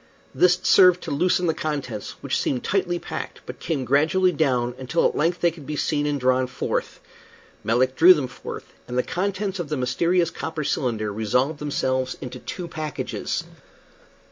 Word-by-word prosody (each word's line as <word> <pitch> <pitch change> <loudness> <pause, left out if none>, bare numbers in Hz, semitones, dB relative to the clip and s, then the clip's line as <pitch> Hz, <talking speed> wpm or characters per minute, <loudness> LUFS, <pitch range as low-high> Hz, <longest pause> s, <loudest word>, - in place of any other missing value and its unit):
This 180 0 +4
served 180 -1 +6
to 165 - -5
loosen 180 +4 +2
the 165 - +2
contents, 140 -10 -4
which - - -1
seemed 125 -3 -1
tightly 185 -3 0
packed, - - -6
but - - -8
came 145 -6 -2
gradually 155 +8 +3
down 125 -6 +1
until 130 +6 +1
at - - -4
length 170 +4 0
they 170 - +4
could 155 -4 -13
be 150 - -3
seen 145 0 0
and 145 -1 -1
drawn 130 0 +2
forth. 125 - -3 0.6
Melick 130 +3 +2
drew 180 +6 +8
them 145 - -1
forth, 125 - -9
and 125 0 -4
the 125 - +3
contents 195 +1 -2
of 165 -4 -4
the 150 - -1
mysterious 170 +7 +1
copper 160 -1 -4
cylinder 110 -7 -1
resolved 125 +8 0
themselves 130 -3 -1
into 125 -1 -7
two 180 +6 -6
packages. 155 -3 -4
150 Hz, 170 wpm, -24 LUFS, 130-175 Hz, 0.6 s, drew